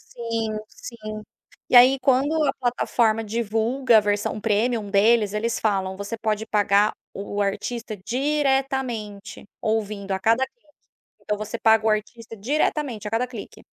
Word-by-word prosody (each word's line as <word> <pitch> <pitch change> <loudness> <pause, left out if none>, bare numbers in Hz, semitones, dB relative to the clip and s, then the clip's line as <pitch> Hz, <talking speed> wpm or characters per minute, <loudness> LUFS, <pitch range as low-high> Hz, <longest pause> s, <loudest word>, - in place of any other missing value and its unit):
Sim, 230 -2 -2 0.2
sim. 215 -3 -9 0.5
E - - +2
aí, 255 +2 +8
quando 270 +2 +2
a - - +1
plataforma 235 -3 0
divulga 225 +3 +1
a - - +8
versão 205 +1 -1
premium 220 0 0
deles, 210 +1 +3
eles 225 +2 -1
falam 190 -3 -1
você 200 +3 -5
pode 220 -1 -2
pagar 205 -1 +2 0.2
o 205 +1 -4
artista 215 +2 -3
diretamente 265 -3 -2 0.2
ouvindo 210 -2 -2
a 190 - 0
cada 230 +6 +2
clique. 475 - -27 0.6
Então 210 - -2
você 215 +2 -5
paga 220 -1 +4
o - - +4
artista 225 +1 -3
diretamente 255 -1 -1
a - - -6
cada 230 +2 +1
clique. 235 -5 -10
220 Hz, 145 wpm, -23 LUFS, 210-245 Hz, 0.6 s, aí